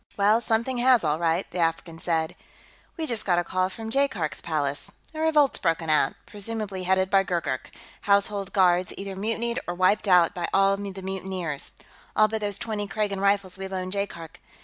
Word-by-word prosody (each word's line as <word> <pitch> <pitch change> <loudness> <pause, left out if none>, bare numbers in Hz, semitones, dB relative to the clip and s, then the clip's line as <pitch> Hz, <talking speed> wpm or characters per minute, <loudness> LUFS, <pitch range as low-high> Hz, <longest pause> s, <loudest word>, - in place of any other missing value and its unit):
"Well, 210 +3 +4
something 235 +2 0
has, 250 -3 +5
all 155 0 +1
right," 170 +2 +1
the 180 - -4
African 165 0 -1
said. 165 -2 -1 0.6
"We 320 - -2
just 235 -7 -1
got 175 -3 +2
a 175 - +2
call 185 +1 0
from 220 +3 -7
Jaikark's 230 - 0
Palace 145 -3 -2 0.2
a 310 - -6
revolt's 310 -3 +3
broken 165 -3 0
out, 145 -3 +3
presumably 205 -3 -5
headed 190 +1 +2
by 195 - +6
Gurgurk; 170 -9 -2 0.4
Household 200 -1 +2
Guards 180 -2 +3
either 195 -1 -5
mutinied 230 +4 -1
or 175 - -2
wiped 185 +4 +2
out 180 -2 +5
by 175 -3 -3
the 195 0 +3 0.3
mutineers, 185 -5 -4 0.4
all 215 - +5
but 220 0 -3
those 205 -2 0
twenty 210 -2 -3
Kragan 200 -1 -2
Rifles 200 -2 +1
we 195 - -4
loaned 185 -1 -4
Jaikark. 175 -5 -5
195 Hz, 175 wpm, -26 LUFS, 175-215 Hz, 0.6 s, by